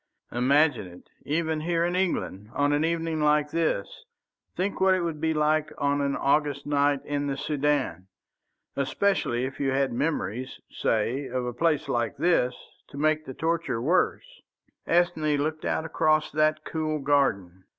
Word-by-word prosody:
Imagine 140 -2 +2
it, 90 0 -15 0.2
even 160 +1 0
here 170 +1 0
in 175 +1 -1
England, 110 - -2
on 145 0 +2
an 145 +1 +2
evening 165 -1 -1
like 150 0 +2
this! 455 - -1 0.5
Think 190 +2 -2
what 190 0 +5
it 185 - -1
would 160 -3 -3
be 160 -1 +1
on 150 -2 +1
an 140 -1 0
August 140 0 +1
night 145 -1 +1
in 145 0 -2
the 135 -1 -2
Soudan! 140 - -1 0.7
Especially 135 -3 0
if 130 - -7
you 140 - +1
had 135 -1 +1
memories, 125 - -2
say, 120 +5 -1
of 125 0 -3
a 120 - -3
place 155 +2 +1
like 120 +3 -1
this, 155 -5 +2 0.3
to 140 - -12
make 155 +1 +1
the 130 - -7
torture 165 -7 -1
worse." 185 - 0 0.5
Ethne 165 -4 +2
looked 155 +2 -2
out 160 - -1
across 155 -1 +1
that 155 0 +1
cool 155 -1 -2
garden. 100 -11 0
150 Hz, 155 wpm, -26 LUFS, 135-160 Hz, 0.7 s, what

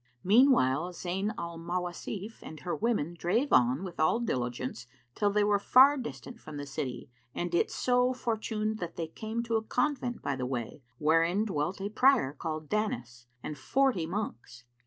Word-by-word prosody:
Meanwhile 180 - +4
Zayn 190 +4 -2
al 170 -1 -5
Mawasif 180 +5 -4
and 155 -2 -10
her 175 -1 -2
women 215 -8 0
drave 180 - 0
on 125 +7 +4
with 185 -3 -7
all 155 +9 +3
diligence 125 - -3 0.3
till 205 - +1
they 205 +1 +2
were 205 -1 +3
far 265 +7 +7
distant 245 -2 -7
from 155 -7 -9
the 145 - -5
city 135 -3 -5 0.2
and 175 0 -3
it 170 - +2
so 250 0 +2
fortuned 220 -3 -2
that 175 -1 -5
they 165 - -2
came 220 +8 -4
to 230 -1 0
a - - -1
convent 250 0 -1
by 140 - -1
the 130 -1 -3
way, 125 +1 -4 0.2
wherein 165 - +3
dwelt 180 -1 -2
a 200 +1 -3
Prior 245 - +4
called 155 +1 -5
Danis 120 - -3 0.2
and 150 -2 -6
forty 255 - +1
monks. 125 - -5
180 Hz, 170 wpm, -30 LUFS, 150-225 Hz, 0.3 s, far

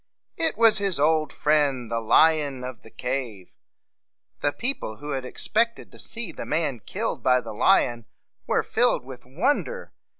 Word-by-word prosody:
It 325 -1 0
was 225 -2 +6
his 195 -6 +1
old 155 -1 +2
friend, 140 -6 +1
the 115 - 0
lion 145 +2 +3
of 125 -1 -7
the - - -15
cave. 120 -7 -5 0.9
The 145 - +1
people, 240 - -3
who 145 +5 -7
had 135 -2 -3
ex - - -4
pect 230 +2 +2
ed - - -14
to - - -14
see 230 -6 -4
the - - -7
man 150 -5 -1
killed - - -4
by 125 0 +3
the 125 - -8
lion, 120 +2 +2 0.4
were - - +1
filled 230 - +1
with 130 -2 -11
wonder. 280 - -1
145 Hz, 170 wpm, -25 LUFS, 125-200 Hz, 0.9 s, was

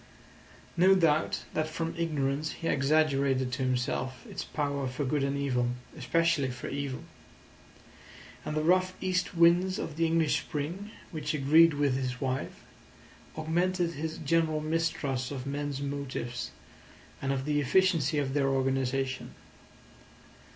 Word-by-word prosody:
No 185 +3 +6
doubt 160 -4 +2
that 155 0 0
from 165 +1 -3
ignorance 150 -2 -1
he 165 - -5
exaggerated 140 -3 +2
to 130 +2 -3
himself 130 0 -1
its - - -5
power 140 -2 -2
for 130 +3 -3
good 140 +1 0
and 140 0 0
evil—especially 135 +4 0
for 120 0 -6
evil; 140 -2 -4 1.4
and 150 - -3
the 155 - +1
rough 185 +2 +3
east 185 -1 -1
winds 175 +3 +4
of 155 - -5
the 165 0 +3
English 160 -2 +2
spring 170 +8 -4 0.2
(which 155 -2 -2
agreed 155 +3 +5
with 145 -2 +2
his 125 -1 -3
wife) 130 -1 -3 0.7
augmented 175 +2 0
his 160 +1 -4
general 160 0 +1
mistrust 150 -5 -1
of 135 -3 -5
men's 140 0 -3
motives 140 -4 -4 0.7
and 135 - -1
of 135 -1 -1
the 150 -1 +1
efficiency 160 0 +3
of 135 -2 0
their 140 -1 +2
organisation. 135 -1 -1
145 Hz, 130 wpm, -29 LUFS, 135-165 Hz, 1.4 s, No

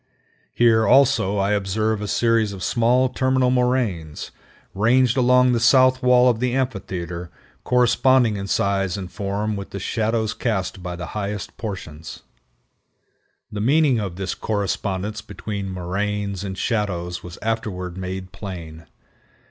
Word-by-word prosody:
Here, 115 -2 +4
also, 125 -7 +4
I 100 +1 +1
observed 105 +2 0
a 105 - -3
series 115 -2 +1
of 95 -2 -7
small 120 +5 +2
terminal 130 0 +1
moraines 125 - -1 0.4
ranged 120 +4 +3
along 125 0 +4
the 120 - +1
south 130 +2 +5
wall 125 -1 +5
of 120 -3 +2
the 125 0 0
amphitheater, 90 -9 -3 0.3
corresponding 125 -1 +3
in 100 0 -4
size 95 -2 0
and 95 -2 -7
form 105 +1 -2
with 100 -1 -6
the 100 - -6
shadows 110 +1 -1
cast 95 -5 -2
by 90 0 -5
the 90 0 -6
highest 105 -1 -4
portions. 85 -8 -7 1.3
The 105 - -4
meaning 140 +1 +3
of 100 -5 -4
this 95 0 -3
correspondence 100 0 -2
between 100 -1 -6
moraines 100 +2 -3
and 95 -1 -5
shadows 90 -6 -2
was 90 -1 -10
afterward 105 -6 -3
made 95 0 -6
plain. 80 -5 -8
105 Hz, 135 wpm, -22 LUFS, 95-120 Hz, 1.3 s, south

